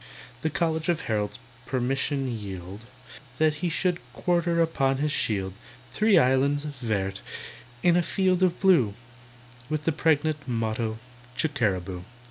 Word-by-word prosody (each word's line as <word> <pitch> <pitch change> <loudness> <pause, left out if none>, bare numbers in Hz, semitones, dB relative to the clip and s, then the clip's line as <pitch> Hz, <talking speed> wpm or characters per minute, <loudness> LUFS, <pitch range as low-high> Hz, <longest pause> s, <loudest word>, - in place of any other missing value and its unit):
The 160 - 0
College 160 0 0
of 170 -2 +1
Heralds 105 -2 -1 0.3
permission 135 +2 0
yield 100 -5 -6 0.6
That 155 +1 +3
he 180 - +1
should 175 +2 0
quarter 170 -1 +1
upon 135 -5 +2
his 150 +2 0
shield 95 -8 -1 0.4
Three 215 - +4
islands, 135 +3 +3
vert, 110 -9 -2 0.6
on 175 -1 +6
a 175 - +5
field 185 +1 +1
of 180 -2 +2
blue, 160 - +4 0.7
With 155 -1 -1
the 165 - +2
pregnant 155 -1 +1
motto 115 -1 -1 0.4
"Chickeraboo." 95 - 0
140 Hz, 125 wpm, -27 LUFS, 110-165 Hz, 0.7 s, on